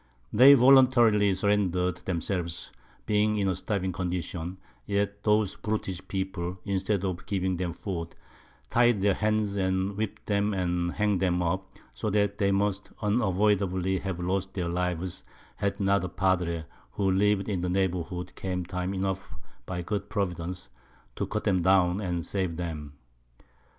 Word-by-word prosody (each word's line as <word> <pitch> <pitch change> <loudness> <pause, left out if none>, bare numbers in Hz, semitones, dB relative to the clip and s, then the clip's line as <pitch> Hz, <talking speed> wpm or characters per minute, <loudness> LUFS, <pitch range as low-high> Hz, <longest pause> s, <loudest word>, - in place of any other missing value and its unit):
They 135 +5 +9
voluntarily 120 -6 +6
surrendered 90 -3 +1
themselves, 90 -1 -3 0.3
being 105 0 +2
in 100 -1 +1
a 95 - +2
starving 95 +1 -2
Condition, 90 0 -4 0.3
yet 100 0 -1
those 105 -2 +2
Brutish 100 -4 -3
People, 95 -2 -3
instead 100 0 0
of 90 -2 -3
giving 95 -2 0
them 90 -1 -2
Food, 85 -2 -5 0.6
tied 120 -3 +4
their 100 0 +4
Hands, 105 0 0
then 95 -1 0
whipp'd 105 +2 -4
them 100 0 +1
and 90 -1 0
hang'd 105 -3 +1
them 90 -1 +1
up, 95 +2 -3 0.2
so 110 - -3
that 100 0 +1
they 100 -1 +3
must 100 0 0
unavoidably 100 -3 +1
have 95 -3 -4
lost 95 +2 -2
their 90 -3 -1
Lives, 90 0 -2 0.3
had 100 +1 -1
not 100 -1 +2
a 90 - -3
Padre, 85 -3 0 0.3
who 100 -2 +1
liv'd 100 +1 +2
in 95 -4 -1
the 90 - -1
Neighbourhood, 90 -1 -1
came 90 -2 -3
time 90 +2 -3
enough 95 0 -3 0.3
by 90 -2 -3
good 100 +3 -3
Providence, 90 - -3 0.5
to - - -2
cut 110 0 -3
'em 95 -3 +3
down, 95 +1 +3
and 90 -4 -2
save 95 -4 -2
them. 75 -5 -5
95 Hz, 150 wpm, -28 LUFS, 90-100 Hz, 0.6 s, They